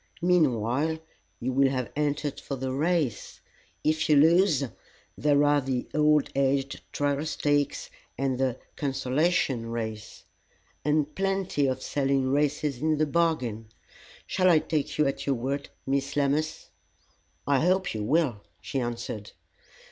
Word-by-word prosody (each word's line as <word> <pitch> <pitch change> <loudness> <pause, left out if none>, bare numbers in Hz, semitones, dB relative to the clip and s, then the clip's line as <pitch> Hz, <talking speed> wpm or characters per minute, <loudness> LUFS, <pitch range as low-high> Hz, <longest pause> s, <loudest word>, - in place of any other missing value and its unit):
Meanwhile, 150 -3 +2 0.4
you 130 +2 -2
will 135 +1 +4
have 130 -5 -3
entered 145 -1 -1
for 140 - -5
the 130 0 -3
race. 150 -5 -1 0.4
If 155 +1 +1
you 150 - +6
lose, 160 0 +5 0.5
there 145 -1 +3
are 145 0 +4
the 130 -2 -2
'All 150 -1 +4
aged 135 0 0
Trial 145 0 0
Stakes,' 145 -2 0 0.3
and 130 -1 -1
the 130 -2 0 0.2
'Consolation 135 -2 0
Race.'" 110 -2 -5 0.6
"And 150 0 +1
plenty 195 -7 0
of 130 - -2
selling 135 -2 0
races 145 -2 0
into 155 0 +2
the 155 - +2
bargain. 130 -10 0 0.6
Shall 185 -1 +2
I 170 - +6
take 155 -1 -1
you 150 - +3
at 135 - -2
your 140 - +2
word, 135 +4 -3 0.2
Miss 135 0 -1
Lammas?" 145 - -1 0.7
"I 140 -2 +3
hope 185 +4 +1
you 110 - -3
will," 135 -4 +1 0.2
she 135 - -3
answered. 115 -3 -5
140 Hz, 135 wpm, -27 LUFS, 130-155 Hz, 0.7 s, you